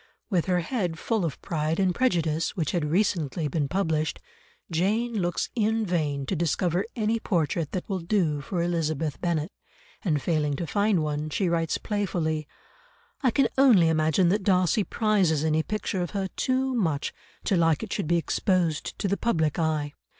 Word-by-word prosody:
With 180 Hz, -3 st, +1 dB
her 180 Hz, -1 st, +2 dB
head 175 Hz, -4 st, -2 dB
full 220 Hz, 0 st, -1 dB
of 160 Hz, -6 st, -3 dB
Pride 155 Hz, 0 st, -1 dB
and 185 Hz, -2 st, +2 dB
Prejudice, 165 Hz, -9 st, 0 dB
which 160 Hz, -6 st, -1 dB
had 170 Hz, -4 st, 0 dB
recently 165 Hz, -4 st, 0 dB
been 145 Hz, 0 st, -1 dB
published, 160 Hz, -3 st, -1 dB, 0.5 s
Jane 215 Hz, +8 st, +1 dB
looks 175 Hz, 0 st, -1 dB
in 220 Hz, -1 st, +1 dB
vain 150 Hz, -6 st, -1 dB
to 190 Hz, -, -2 dB
discover 170 Hz, +3 st, 0 dB
any 225 Hz, 0 st, 0 dB
portrait 165 Hz, -6 st, -1 dB
that 185 Hz, -, -3 dB
will 195 Hz, -2 st, -2 dB
do 165 Hz, -5 st, 0 dB
for 170 Hz, +3 st, -2 dB
Elizabeth 160 Hz, -3 st, -1 dB
Bennet, 170 Hz, -1 st, -1 dB, 0.5 s
and 155 Hz, -6 st, +1 dB
failing 150 Hz, -2 st, 0 dB
to 170 Hz, -, -3 dB
find 200 Hz, -1 st, +1 dB
one, 150 Hz, 0 st, -2 dB
she 185 Hz, +4 st, 0 dB
writes 165 Hz, -2 st, 0 dB
playfully, 165 Hz, -7 st, -2 dB, 0.7 s
"I 260 Hz, -, +3 dB
can 265 Hz, +3 st, +3 dB
only 215 Hz, -12 st, +6 dB
imagine 160 Hz, +2 st, +3 dB
that 205 Hz, +3 st, +2 dB
Darcy 190 Hz, +2 st, +2 dB
prizes 195 Hz, -9 st, +1 dB
any 160 Hz, 0 st, +2 dB
picture 210 Hz, 0 st, -2 dB
of 175 Hz, +4 st, -3 dB
her 190 Hz, -1 st, -1 dB
too 260 Hz, +4 st, 0 dB
much 165 Hz, -, 0 dB, 0.3 s
to 195 Hz, -, +1 dB
like 165 Hz, -1 st, +2 dB
it 220 Hz, -, -4 dB
should 200 Hz, -7 st, -2 dB
be 170 Hz, +1 st, +3 dB
exposed 170 Hz, -2 st, 0 dB
to -, -, -1 dB
the 200 Hz, +1 st, 0 dB
public 160 Hz, -9 st, 0 dB
eye. 155 Hz, -3 st, 0 dB
175 Hz, 170 wpm, -26 LUFS, 155-200 Hz, 0.7 s, only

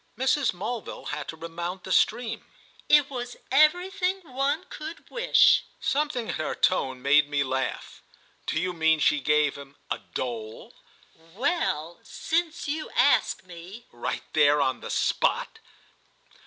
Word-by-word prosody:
Mrs. 265 Hz, +1 st, +2 dB
Mulville 215 Hz, +6 st, -5 dB
had 150 Hz, 0 st, -4 dB
to 160 Hz, -, -7 dB
remount 170 Hz, +3 st, -5 dB
the 190 Hz, -, -7 dB
stream. 230 Hz, +4 st, +1 dB, 0.5 s
"It 295 Hz, -2 st, +6 dB
was 245 Hz, -3 st, -6 dB
everything 360 Hz, +6 st, +3 dB
one 280 Hz, +3 st, -1 dB
could 315 Hz, +2 st, -9 dB
wish." -, -, +5 dB, 0.2 s
Something 280 Hz, -5 st, -1 dB
in -, -, -1 dB
her 155 Hz, -, -3 dB
tone 130 Hz, -8 st, 0 dB
made 145 Hz, +1 st, +4 dB
me 145 Hz, -1 st, +1 dB
laugh. 130 Hz, -2 st, -3 dB, 0.5 s
"Do -, -, 0 dB
you 185 Hz, 0 st, -1 dB
mean 160 Hz, -1 st, +3 dB
she 150 Hz, 0 st, +3 dB
gave 150 Hz, +1 st, +2 dB
him—a 140 Hz, 0 st, -7 dB, 0.2 s
dole?" 115 Hz, -3 st, -5 dB, 0.6 s
"Well, 200 Hz, -, -1 dB
since 335 Hz, -1 st, -2 dB
you 305 Hz, +2 st, -3 dB
ask -, -, +3 dB
me!" 180 Hz, +6 st, -11 dB
"Right 120 Hz, -, -4 dB
there 145 Hz, -1 st, +5 dB
on 130 Hz, -2 st, +1 dB
the -, -, -7 dB
spot?" -, -, 0 dB
185 Hz, 135 wpm, -26 LUFS, -, 0.6 s, It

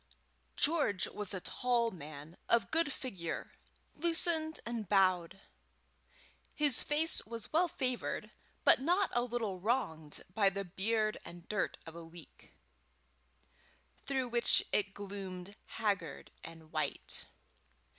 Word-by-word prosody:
George 290 Hz, -, +2 dB
was 210 Hz, -3 st, -1 dB
a 190 Hz, -, -1 dB
tall 240 Hz, +1 st, +1 dB
man, 155 Hz, -1 st, -9 dB
of 230 Hz, -5 st, +3 dB
good 325 Hz, -2 st, +2 dB
figure, 190 Hz, -12 st, -4 dB, 0.4 s
loosened 320 Hz, -1 st, +3 dB
and 230 Hz, -5 st, -3 dB
bowed. 190 Hz, -2 st, +3 dB, 1.1 s
His 295 Hz, -5 st, +2 dB
face 310 Hz, +2 st, +2 dB
was 230 Hz, +2 st, -6 dB
well 345 Hz, +3 st, +5 dB
favoured, 255 Hz, -6 st, -2 dB, 0.3 s
but -, -, +6 dB
not 355 Hz, +6 st, +2 dB
a 240 Hz, -, +3 dB
little 230 Hz, -6 st, -2 dB
wronged 170 Hz, -, -1 dB
by 200 Hz, -1 st, +5 dB
the 200 Hz, +1 st, -3 dB
beard 215 Hz, +4 st, 0 dB
and 175 Hz, 0 st, -11 dB
dirt 210 Hz, -1 st, -1 dB
of 165 Hz, -, -9 dB
a 170 Hz, -, -7 dB
week, 165 Hz, +1 st, -14 dB, 1.5 s
through 265 Hz, -3 st, -1 dB
which 235 Hz, 0 st, +4 dB
it 195 Hz, -1 st, +1 dB
gloomed 195 Hz, -1 st, -6 dB
haggard 195 Hz, -9 st, -2 dB
and 160 Hz, -1 st, -11 dB
white. -, -, -2 dB
210 Hz, 120 wpm, -34 LUFS, 180-255 Hz, 1.5 s, but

